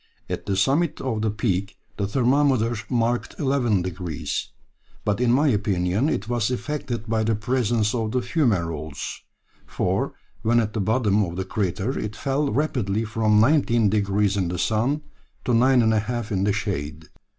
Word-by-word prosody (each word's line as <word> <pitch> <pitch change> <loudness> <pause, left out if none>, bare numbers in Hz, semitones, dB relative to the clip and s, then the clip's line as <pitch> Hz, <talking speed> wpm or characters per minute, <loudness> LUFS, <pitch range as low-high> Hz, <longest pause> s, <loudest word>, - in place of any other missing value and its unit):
At - - -5
the 100 - +1
summit 140 - +1
of 115 -5 -2
the 110 - +1
peak 100 -2 -1 0.2
the 100 - -1
thermometer 125 0 +2
marked 120 -1 0
11 125 - +1
degrees, 90 -4 -4 0.6
but 105 +2 0
in 120 -1 +3
my 145 +4 +4
opinion 100 - +1
it 110 -7 -2
was 120 -2 0
affected 125 -3 -3
by 110 -1 0
the 110 0 +1
presence 115 -1 0
of 110 -3 -1
the 125 - +1
fumerolles, 90 - -1 0.5
for - - -1 0.3
when 120 +2 +3
at 110 -2 -1
the 110 - -1
bottom 105 -1 +2
of 85 -2 -4
the 95 +1 -3
crater 100 +5 -2
it 105 0 -4
fell 140 +4 0
rapidly 115 -6 0
from 105 -1 +2
19 120 -5 +3
degrees 100 -1 +1
in 95 -3 0
the 90 +1 -3
sun 120 - 0 0.4
to 125 - +1
9 125 +2 +5
degrees 110 -1 +3
5' 120 -2 -3
in 95 -1 +1
the 105 - +2
shade." 80 -6 -3
110 Hz, 165 wpm, -24 LUFS, 100-125 Hz, 0.6 s, 9